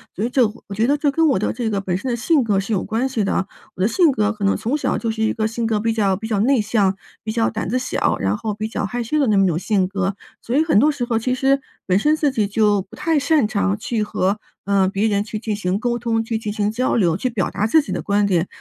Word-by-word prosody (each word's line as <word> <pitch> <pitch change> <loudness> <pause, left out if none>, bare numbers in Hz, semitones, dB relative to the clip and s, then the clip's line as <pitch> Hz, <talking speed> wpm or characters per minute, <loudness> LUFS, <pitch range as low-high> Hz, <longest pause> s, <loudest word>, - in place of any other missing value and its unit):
所 205 - -3
以 240 - 0
这 255 -1 +3 0.2
我 200 - -6
觉 220 +3 +2
得 280 +4 +3
这 290 0 +1
跟 325 +3 +2
我 255 - +2
的 - - 0
这 240 -3 -3
个 200 -1 -1
本 180 -2 -1
身 255 +5 -3
的 235 - 0
性 275 +4 +2
格 205 -4 +1
是 200 +3 -3
有 185 - 0
关 235 +5 -1
系 225 -5 -1
的， 190 0 0 0.3
我 - - -6
的 195 - +4
性 335 +4 +3
格 215 -4 +1
可 210 -2 -7
能 195 - +3
从 255 +7 -1
小 - - -1
就 230 - -2
是 220 0 -2
一 220 - +1
个 220 -1 0
性 230 +1 -3
格 220 -2 +1
比 225 +2 0
较 200 -4 +1
比 220 +4 -6
较 215 -3 0
内 255 +1 +3
向、 205 -3 +1 0.3
比 220 - -3
较 225 0 +1
胆 220 -4 -4
子 250 +5 0
小， 255 - -1
然 95 +2 0
后 215 -2 -3
比 215 +1 -4
较 215 - -3
害 245 +5 -3
羞 270 +7 -1
的 280 - +3
那 215 -4 +2
么 195 - +4
一 - - +3
种 165 -3 0
性 190 +1 +1
格。 195 0 -2 0.3
所 240 - -2
以 305 - +4
很 320 -9 +2
多 290 +8 +5
时 280 -4 -4
候 235 -2 0
其 255 +3 0
实 270 +1 +2 0.3
本 185 0 +3
身 300 +9 +3
自 300 -2 +1
己 220 -5 0
就 205 -1 +2
不 215 +4 -15
太 310 +2 0
擅 285 -4 +2
长 200 -2 0
去 225 -1 -1
和， 200 0 -1 0.3
呃， 195 -1 +2
别 200 +3 0
人 200 -1 +1
去 215 0 -5
进 215 -1 -3
行 190 -1 -1
沟 240 +1 -1
通、 230 -1 0
去 225 0 -2
进 215 -1 -4
行 205 0 0
交 245 +4 0
流、 175 -8 +2
去 255 +8 -1
表 220 -6 -1
达 205 - -1
自 310 +9 +4
己 - - -8
的 - - -2
观 205 0 +1
点。 180 -2 +1
220 Hz, 320 characters per minute, -20 LUFS, 200-245 Hz, 0.3 s, 多